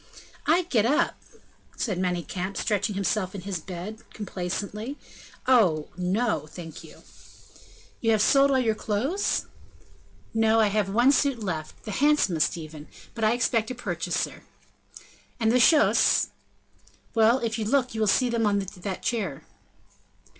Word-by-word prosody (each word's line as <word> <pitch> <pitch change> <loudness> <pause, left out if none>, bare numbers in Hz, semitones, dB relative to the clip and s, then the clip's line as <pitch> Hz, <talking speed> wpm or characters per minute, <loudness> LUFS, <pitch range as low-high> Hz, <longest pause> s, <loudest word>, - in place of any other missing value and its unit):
"I 345 +4 +4
get 245 -11 +1
up!" 300 +6 +2 0.6
said 195 -7 -2
Manicamp, 180 +1 -2
stretching 205 0 0
himself 195 0 -1
in 195 - -5
his 190 -2 -4
bed, 190 +6 -7
complacently, 210 +6 -4 0.5
"oh, 185 -12 +3
no, 185 -2 -1
thank 160 0 -10
you!" - - -15 1.0
"You 225 - 0
have 220 -2 +3
sold 275 +3 +5
all 270 - +3
your 235 -4 +2
clothes?" 235 - -1 0.9
"No, 225 0 +3
I 215 -2 +4
have 205 -1 0
one 240 +7 +4
suit 275 -5 +1
left, 160 -5 -5
the 215 - -6
handsomest 195 - +2
even, 155 -2 -9 0.3
but 225 - -5
I 215 +1 +4
expect 230 -2 +1
a 255 - -4
purchaser." 250 - -3 1.0
"And 225 -1 +2
the 250 - +4
chausses?" 300 +4 +4 0.8
"Well, 225 +1 +4
if 230 -3 -2
you 215 - -2
look, 255 +1 +1
you 220 - -4
will 215 - +2
see 250 +5 +3
them 230 -2 +1
on 200 -1 +2 0.2
that 185 +1 -5
chair." 195 - -2
215 Hz, 145 wpm, -26 LUFS, 185-240 Hz, 1.0 s, sold